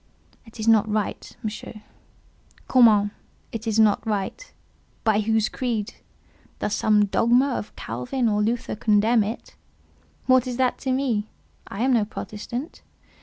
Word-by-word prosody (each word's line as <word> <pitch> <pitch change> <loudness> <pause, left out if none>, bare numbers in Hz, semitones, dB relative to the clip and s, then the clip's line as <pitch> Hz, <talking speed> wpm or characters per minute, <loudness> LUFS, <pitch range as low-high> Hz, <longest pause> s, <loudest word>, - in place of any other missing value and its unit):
"It 225 - -15
is 215 - -3
not 220 -1 +4
right, 210 -1 -3
Monsieur." 215 0 -6 0.8
"Comment? 215 -5 +5 0.4
it 225 0 -6
is 220 -1 0
not 215 -2 +4
right? 215 - -3 0.5
By 220 -2 +3
whose 220 0 +1
creed? 230 -5 -3 0.6
Does 210 - -2
some 210 -1 +3
dogma 240 +6 +3
of 210 - -5
Calvin 125 - -2
or 210 -1 +1
Luther 230 +2 -1
condemn 215 +1 +3
it? 220 +4 -6 0.7
What 255 -1 +4
is 245 -1 -4
that 255 -1 +1
to 265 - -2
me? 245 -6 0 0.4
I 200 - -6
am 260 0 +3
no 230 -3 +3
Protestant. 230 +7 -7
220 Hz, 140 wpm, -24 LUFS, 210-245 Hz, 0.8 s, Comment